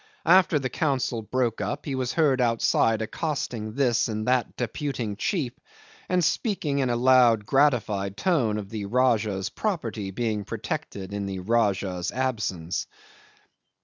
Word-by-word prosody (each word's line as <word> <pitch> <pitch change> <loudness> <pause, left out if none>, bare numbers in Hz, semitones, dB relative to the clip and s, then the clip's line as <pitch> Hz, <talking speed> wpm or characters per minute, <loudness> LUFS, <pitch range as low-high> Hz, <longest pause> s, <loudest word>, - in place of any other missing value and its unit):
After 180 -4 +5
the 135 -2 -1
council 130 -7 0
broke 120 +1 -1
up 145 - -3
he 140 - -3
was 130 -1 -2
heard 140 -6 +3
outside 115 -1 +2
accosting 115 -5 -3
this 125 -4 +2
and 110 0 -3
that 125 -1 +1
deputing 120 -3 -3
chief, 135 - -1 0.6
and 180 -2 +2
speaking 160 - 0
in 130 -2 +1
a 120 - +1
loud, 120 -3 +5
gratified 110 -8 +1
tone 130 - +1
of 100 -2 -6
the 105 -2 -4
Rajah's 110 -5 +1
property 115 - -3
being 105 +1 -2
protected 95 0 -5
in 100 -1 -3
the 95 -1 -4
Rajah's 95 -3 0
absence. 105 -10 -2
120 Hz, 140 wpm, -26 LUFS, 105-135 Hz, 0.6 s, After